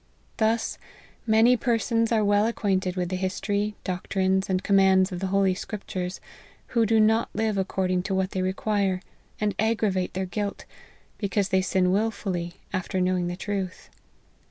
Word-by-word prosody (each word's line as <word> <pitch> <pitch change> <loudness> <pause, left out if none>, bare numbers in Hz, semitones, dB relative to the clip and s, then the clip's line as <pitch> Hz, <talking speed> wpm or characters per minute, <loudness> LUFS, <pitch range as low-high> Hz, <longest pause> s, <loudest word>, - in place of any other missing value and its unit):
Thus, 225 +1 0 0.5
many 225 +3 +5
persons 230 -1 +1
are 220 -2 +3
well 205 +1 +3
acquainted 190 -5 0
with 180 -2 -1
the 185 - -2
history, 200 +3 -1
doctrines, 190 +1 0
and 185 0 0
commands 190 -1 +4
of 180 - -4
the 190 - -2
holy 195 0 +2
scriptures, 185 -2 -5 0.5
who 230 -2 +2
do 225 +1 +4
not 220 +2 +3
live 220 -1 0
according 185 -1 0
to 190 - 0
what 190 0 0
they 185 - -2
require, 190 0 0 0.4
and 210 -1 0
aggravate 215 -5 0
their 190 0 -1
guilt, 200 +3 -4 0.5
because 200 -1 0
they 190 0 +3
sin 185 0 +1
wilfully, 190 -4 -1 0.2
after 185 0 -2
knowing 180 -1 +1
the 175 - -3
truth. 195 -1 -4
195 Hz, 155 wpm, -26 LUFS, 185-215 Hz, 0.5 s, many